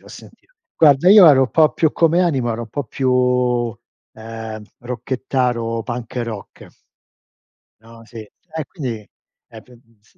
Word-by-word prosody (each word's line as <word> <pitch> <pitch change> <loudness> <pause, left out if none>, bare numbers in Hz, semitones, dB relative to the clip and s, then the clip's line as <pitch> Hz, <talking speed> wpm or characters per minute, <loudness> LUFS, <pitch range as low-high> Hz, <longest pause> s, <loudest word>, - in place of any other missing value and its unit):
l'ho - - -18
sentito. - - -16 0.2
Guarda 150 +1 +4
io 195 -4 +9
ero 135 -2 +5
un 130 - -1
po' 155 -2 +4
più 160 -2 +1
come 170 +2 +2
anima, 135 -9 0
ero 115 +1 -4
un 115 - -9
po' 145 - -3
più, 125 -1 0 0.4
ehm, 110 -1 -8 0.2
rockettaro, 120 -2 -3
punk-rock. 120 -3 -7 1.1
No, 115 0 -16
sì. 115 0 -12
E 155 - -9
quindi, 120 - -6 0.4
ehm, - - -13 0.4
s 105 - -31
125 Hz, 135 wpm, -19 LUFS, 115-145 Hz, 1.1 s, io